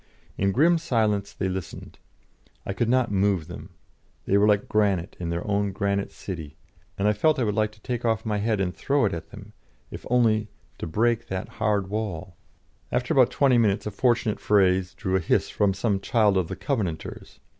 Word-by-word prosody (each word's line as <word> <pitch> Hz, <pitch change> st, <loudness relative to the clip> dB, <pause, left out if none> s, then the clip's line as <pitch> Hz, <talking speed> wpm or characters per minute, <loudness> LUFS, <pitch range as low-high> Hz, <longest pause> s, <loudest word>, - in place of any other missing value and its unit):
In 100 Hz, 0 st, +1 dB
grim 165 Hz, -, +4 dB
silence 110 Hz, -9 st, 0 dB
they 95 Hz, -, -3 dB
listened; 95 Hz, -1 st, -6 dB, 0.7 s
I 100 Hz, -, -3 dB
could 115 Hz, +3 st, -1 dB
not 125 Hz, -2 st, +2 dB
move 95 Hz, -4 st, +1 dB
them; -, -, -9 dB, 0.6 s
they 100 Hz, -, +1 dB
were 100 Hz, +1 st, +5 dB
granite 100 Hz, -4 st, 0 dB
like 85 Hz, -2 st, -3 dB
their 85 Hz, +1 st, -3 dB
own 100 Hz, 0 st, 0 dB
granite 100 Hz, 0 st, -1 dB
city, 80 Hz, -6 st, -8 dB, 0.4 s
and 100 Hz, -, +1 dB
I 105 Hz, -, +4 dB
felt 155 Hz, +9 st, +2 dB
I 130 Hz, -, +1 dB
would 105 Hz, -2 st, 0 dB
like 110 Hz, 0 st, 0 dB
to 105 Hz, -, -21 dB
take 120 Hz, 0 st, -4 dB
off 110 Hz, -1 st, 0 dB
my 105 Hz, -2 st, -1 dB
head 110 Hz, 0 st, 0 dB
and 95 Hz, -1 st, -1 dB
throw 140 Hz, -3 st, +1 dB
it 100 Hz, -, 0 dB
at 80 Hz, -1 st, -6 dB
them, 105 Hz, 0 st, -12 dB, 0.4 s
if -, -, -8 dB
only 110 Hz, -3 st, +3 dB, 0.3 s
to -, -, -4 dB
break 115 Hz, +7 st, +1 dB
that 95 Hz, -1 st, -4 dB
hard 100 Hz, -3 st, -1 dB
wall. 95 Hz, -5 st, -4 dB, 0.6 s
After 125 Hz, +5 st, 0 dB
about 130 Hz, -5 st, +5 dB
twenty 130 Hz, -4 st, +3 dB
minutes, 105 Hz, -3 st, +1 dB
a 105 Hz, -, -3 dB
fortunate 120 Hz, 0 st, +1 dB
phrase 95 Hz, -3 st, +2 dB
drew 95 Hz, 0 st, -2 dB
a -, -, +3 dB
hiss 85 Hz, -, 0 dB
from 100 Hz, -1 st, +2 dB
some 100 Hz, +1 st, 0 dB
child 105 Hz, 0 st, +2 dB
of 95 Hz, -3 st, +1 dB
the -, -, -5 dB
Covenanters. 100 Hz, -, -4 dB
105 Hz, 195 wpm, -25 LUFS, 95-115 Hz, 0.7 s, were